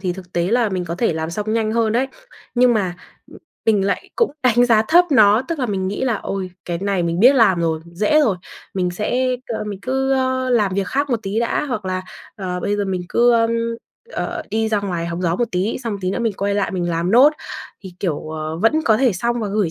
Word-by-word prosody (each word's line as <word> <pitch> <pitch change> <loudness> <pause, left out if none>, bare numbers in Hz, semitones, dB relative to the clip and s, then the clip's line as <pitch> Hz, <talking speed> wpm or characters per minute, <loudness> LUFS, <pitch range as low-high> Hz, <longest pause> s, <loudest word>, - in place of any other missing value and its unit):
thì 185 -2 -1
thực 180 -1 -11
tế 170 0 0
là 235 -1 +3
mình 185 -3 -2
có 170 - -4
thể 185 0 +1
làm 160 0 -3
xong 210 +4 -3
nhanh 220 -1 0
hơn 225 -1 +1
đấy, 250 +4 +1 0.5
nhưng 245 -1 +4
mà, 190 -5 0 0.4
ừm, - - -13 0.3
mình 205 -3 +3
lại 200 - -2
cũng 465 - +2
đánh 245 -1 +4
giá 225 -3 +4
thấp 350 +2 +6
nó. 215 -4 +5
Tức 335 -2 -2
là 255 - 0
mình 190 -3 -2
nghĩ 205 +6 -2
là: 245 -3 +1
"Ôi, 190 -2 -4
cái 170 -1 -3
này 195 -1 0
mình 170 +1 -1
biết 255 +6 +7
làm 210 -9 +4
rồi, 160 -1 0
dễ 210 - +3
rồi, 220 -11 +2 0.4
mình 180 -2 0
sẽ 250 +7 0
c 235 -4 -5
mình 205 -2 -5
cứ, 265 +2 0
ờ, 260 -1 0
làm 210 -6 +2
việc 195 -2 0
khác 280 +5 -1
một 240 - +1
tí 195 +3 -2
đã, 235 +5 0
hoặc 245 -8 -4
là, 185 0 -2 0.3
ờ, 180 -3 -4
bây 205 +3 -1
giờ 205 - 0
mình 185 -2 -2
cứ, 240 +3 +4
ờm, 230 -1 +3 0.6
ờ, 345 -2 -3
đi 220 +1 0
ra 210 -2 +1
ngoài 175 -4 -3
hóng 170 +1 -4
gió 170 0 +1
một 240 - +1
tí, 185 +5 0
xong 230 - -2
một 200 - -4
tí 185 - 0
nữa 195 - -2
mình 230 -2 0
quay 200 +1 -1
lại 205 -1 0
mình 175 -2 -2
làm 170 +2 -1
nốt 260 +7 +7 0.5
thì, 185 -2 -9
kiểu, 155 -4 -2
ờ, 155 0 -4
vẫn 225 - +2
có 220 - +4
thể 250 -2 +3
xong 235 +6 -1
và 210 - -2
gửi 200 -4 0
210 Hz, 255 wpm, -20 LUFS, 185-240 Hz, 0.6 s, biết